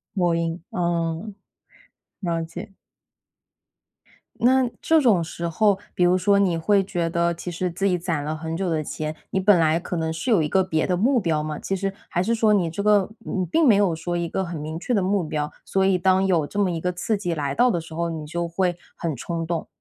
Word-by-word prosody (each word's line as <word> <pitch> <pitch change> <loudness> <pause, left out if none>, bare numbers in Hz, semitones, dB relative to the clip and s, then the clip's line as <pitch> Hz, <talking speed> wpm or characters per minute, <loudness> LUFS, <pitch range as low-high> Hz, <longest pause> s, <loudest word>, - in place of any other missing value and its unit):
某 175 -3 +2
音， 165 0 -2
嗯， 170 +3 -2 0.9
了 170 -3 -1
解。 170 +4 -9 1.7
那 255 +2 +4
这 320 -1 +4
种 210 - +3
时 170 +1 -5
候， 200 +4 +2 0.2
比 180 - +1
如 180 +1 +4
说 200 +2 +3
你 180 -4 +2
会 195 +4 +3
觉 175 -3 -2
得 170 0 +1
其 175 +1 -6
实 180 +2 -2
自 185 +3 -3
己 180 - +2
攒 165 -5 -2
了 155 +1 -3
很 160 +1 -4
久 190 -1 -1
的 160 -2 0
钱， 155 +1 -4
你 190 - 0
本 190 -2 +5
来 160 +1 +3
可 180 - -5
能 160 -1 -1
是 195 +10 -2
有 190 -7 +5
一 150 - 0
个 190 -1 +3
别 160 -4 0
的 180 - +1
目 245 +7 +3
标 160 -6 0
嘛， 155 -1 -4
其 195 - -2
实 195 0 -2 0.2
还 175 - 0
是 230 - +1
说 220 -2 +3
你 180 -5 +2
这 170 +5 -4
个 205 -2 +3
你 190 -4 -3
并 300 - +2
没 220 - +7
有 195 -5 +2
说 175 +2 -3
一 170 0 -1
个 190 - -2
很 170 -3 -5
明 155 +2 -5
确 245 - -2
的 200 - +2
目 190 -1 +1
标。 150 -1 -2
所 190 0 +1
以 190 -1 +3
当 190 +1 +3
有 170 -6 +2
这 205 - -8
么 195 -3 +2
一 165 -1 -3
个 180 - 0
刺 195 +5 -1
激 180 -4 -2
来 140 -2 -2
到 245 - +4
的 175 -7 0
时 160 0 -10
候， 170 +1 -1
你 160 -2 -5
就 170 +3 -3
会 175 +1 0 0.2
很 165 -4 -3
冲 165 +6 -4
动。 170 0 -3
175 Hz, 250 characters per minute, -23 LUFS, 165-195 Hz, 1.7 s, 没